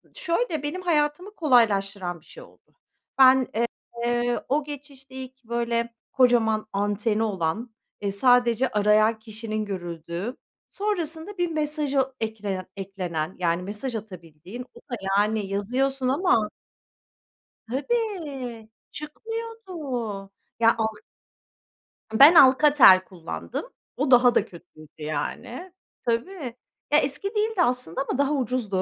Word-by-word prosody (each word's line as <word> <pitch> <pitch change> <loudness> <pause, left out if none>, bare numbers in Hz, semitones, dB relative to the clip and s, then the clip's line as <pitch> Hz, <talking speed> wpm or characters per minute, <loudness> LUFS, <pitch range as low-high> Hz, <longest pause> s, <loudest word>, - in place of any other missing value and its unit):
şöyle, 340 - -1
benim 310 +6 -3
hayatımı 340 +3 0
kolaylaştıran 200 - +2
bir - - -26
şey - - -12
oldu. - - -22 0.4
Ben, 260 -1 +6 0.6
eee, 240 0 +1
o 295 +2 +2
geçişte 280 -2 -10
ilk 260 0 -9
böyle, 235 0 -1 0.2
kocaman 235 -5 +3
anteni 205 +2 0
olan, 210 +3 -2 0.3
eee, 200 -1 -1
sadece 245 +3 +3
arayan 215 0 +3
kişinin 215 -1 -5
görüldüğü, 175 +3 -5 0.3
sonrasında 380 -2 -3
bir 350 0 +1
mesaja 295 -3 0
eklenen 210 -4 -3
eklenen, 185 -4 -4
yani 170 0 0
mesaj 210 +6 -4
atabildiğin, 185 +2 -9
o - - -14
da 245 - -6 0.2
yani 210 0 +1
yazıyorsun 255 +7 -1
ama 265 - +2 1.2
Tabii 280 - -3 0.2
çıkmıyordu. 450 +7 -7 0.9
Ya 230 0 +5
al 220 -1 0 1.2
Ben 280 +10 +8
Alcatel 265 - +7
kullandım, 175 - -6 0.3
o - - 0
daha 245 -1 +6
da 205 - +3
kötüydü 170 -5 -15 0.2
yani. 155 - -4 0.3
Tabii. 245 +2 -2 0.4
Ya 295 - +6
eski 285 +7 -1
değildi 425 -2 +1
aslında 250 - 0
ama - - 0
daha 280 +1 +2
ucuzdu. 245 -8 -1
240 Hz, 110 wpm, -25 LUFS, 205-290 Hz, 1.2 s, Ben